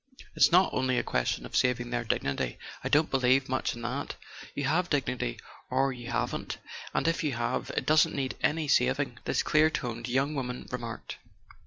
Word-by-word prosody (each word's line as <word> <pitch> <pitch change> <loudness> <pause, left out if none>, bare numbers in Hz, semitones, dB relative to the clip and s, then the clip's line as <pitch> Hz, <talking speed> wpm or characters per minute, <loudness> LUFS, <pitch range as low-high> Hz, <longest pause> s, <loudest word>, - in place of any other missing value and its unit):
"It's - - +5
not 180 +2 +5
only 130 -1 +1
a - - +2
question - - -1
of - - -8
saving 120 -1 +1
their 120 0 0
dignity: 70 - -1 0.3
I - - -1
don't 155 +2 +3
believe 130 0 +3
much 130 -1 -1
in 120 - -8
that. 125 +4 -3 0.4
You 140 - -2
have 175 +6 +1
dignity 130 - -1 0.3
or 135 +1 +2
you 120 -1 -8
haven't—and 120 +6 -3
if 165 0 +1
you 150 -3 0
have, 120 +1 -2
it - - 0
doesn't 155 0 +4
need 135 -2 -2
any 155 0 +1
sav¬ 130 0 +3
ing," 125 -4 -3
this - - +1
clear 155 +1 +4
toned 120 -5 -4
young 135 +4 +1
woman 125 -3 -4
remarked. 120 -2 -5
130 Hz, 185 wpm, -29 LUFS, 120-145 Hz, 0.4 s, It's